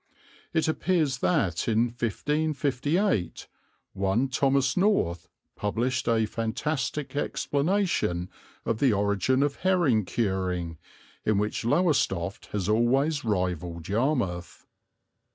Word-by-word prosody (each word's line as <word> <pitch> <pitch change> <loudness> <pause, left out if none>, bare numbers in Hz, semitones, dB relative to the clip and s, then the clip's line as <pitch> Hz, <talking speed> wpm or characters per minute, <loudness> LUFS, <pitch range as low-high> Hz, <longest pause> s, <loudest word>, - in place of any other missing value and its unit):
It 160 -1 +1
appears 155 -5 +1
that 90 -3 +1
in 115 +1 +2
1558 145 - -1 0.5
one 100 +7 +1
Thomas 135 0 +2
North 180 - +1 0.3
published 120 +5 -1
a 115 -1 +3
fantastic 135 +7 -3
explanation 145 - 0 0.4
of 115 -1 -1
the 135 -5 +4
origin 100 +6 +2
of 145 -1 -1
herring 170 - +2
curing, 90 -6 -2 0.4
in 110 -2 +2
which 105 +4 -1
Lowestoft 115 - +1
has 100 -3 -3
always 135 +8 +2
rivalled 90 -5 -2
Yarmouth. 105 - -1
120 Hz, 100 wpm, -27 LUFS, 95-145 Hz, 0.5 s, the